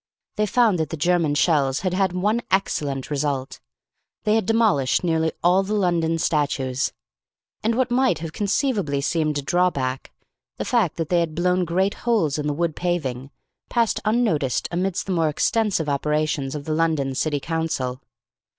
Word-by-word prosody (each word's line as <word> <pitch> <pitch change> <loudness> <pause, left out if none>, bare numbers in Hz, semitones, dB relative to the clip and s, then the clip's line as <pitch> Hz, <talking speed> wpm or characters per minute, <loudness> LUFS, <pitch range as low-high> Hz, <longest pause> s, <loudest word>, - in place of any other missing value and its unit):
They 210 -1 +1
found 220 -5 +3
that 160 -2 -1
the 165 - -5
German 165 -1 +2
shells 145 -4 +2
had 185 -1 -1
had 190 0 +1
one 205 +6 0
excellent 145 -8 -1
result, 140 -2 -2 0.6
they 210 - +2
had 220 -4 +1
demolished 215 - +2
nearly 160 -2 +1
all 180 +2 +4
the 200 +2 -2
London 170 -4 +1
statues. 140 -4 0 0.7
And 225 +1 +1
what 255 0 0
might 255 - +2
have 160 0 -6
conceivably 200 - 0
seemed 155 0 0
a 145 - -3
draw 180 +5 +2
back, 130 -4 -4 0.5
the - - -3
fact 225 -10 +1
that 165 -2 -3
they 175 - +3
had 165 -2 -2
blown 180 +1 +1
great 190 +4 +1
holes 200 - +1
in 150 - -2
the 145 - 0
wood 170 0 -1
paving, 140 -8 -2 0.4
passed 235 -2 +1
unnoticed 210 - +1
amidst 180 +1 -1
the 195 - -3
more 165 -3 +2
extensive 200 +1 0
operations 150 -1 -1
of 145 -1 -6
the 155 - -1
London 155 -4 +1
County 145 +2 -1
Council. 145 -6 -2
165 Hz, 170 wpm, -23 LUFS, 145-195 Hz, 0.7 s, all